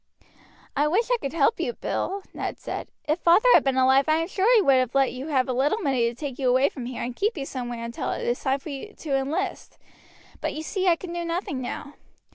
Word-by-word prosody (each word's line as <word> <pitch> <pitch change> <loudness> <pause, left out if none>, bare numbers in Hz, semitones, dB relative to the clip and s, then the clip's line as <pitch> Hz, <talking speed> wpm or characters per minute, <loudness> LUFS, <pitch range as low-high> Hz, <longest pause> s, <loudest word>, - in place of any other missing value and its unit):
"I 290 +1 +2
wish 440 +10 +1
I - - +4
could 275 - -4
help 325 +6 +2
you, 485 - -1
Bill," 395 -3 -3
Ned - - -4
said: - - -5 0.2
"if 305 +3 +1
father 345 +9 +5
had - - +6
been 270 -1 +1
alive 265 +1 +5
I 310 - +5
am 330 +1 0
sure 390 +4 +2
he 440 - +6
would 270 -4 +5
have 255 0 0
let 270 -1 +3
you 260 +3 -6
have 265 -5 +1
a 255 - -1
little 275 - +2
money 265 - +1
to 235 - -9
take 275 0 -6
you 260 -2 +2
away 260 +3 +4
from 245 -3 -7
here 250 - -5
and 240 0 -4
keep 415 - 0
you 275 - -3
somewhere 245 -3 -5
until 235 0 -4
it - - -3
is 240 - 0
time 265 0 +1
for 290 - -9
you 285 +10 -7
to 290 -4 -2
enlist; 270 +3 -3 0.6
but - - -3
you 310 - -4
see 380 +3 -1
I 345 - +6
can 345 0 -8
do 345 0 -3
nothing 335 -6 -3
now." 280 +3 -6
280 Hz, 255 wpm, -25 LUFS, 255-340 Hz, 0.6 s, had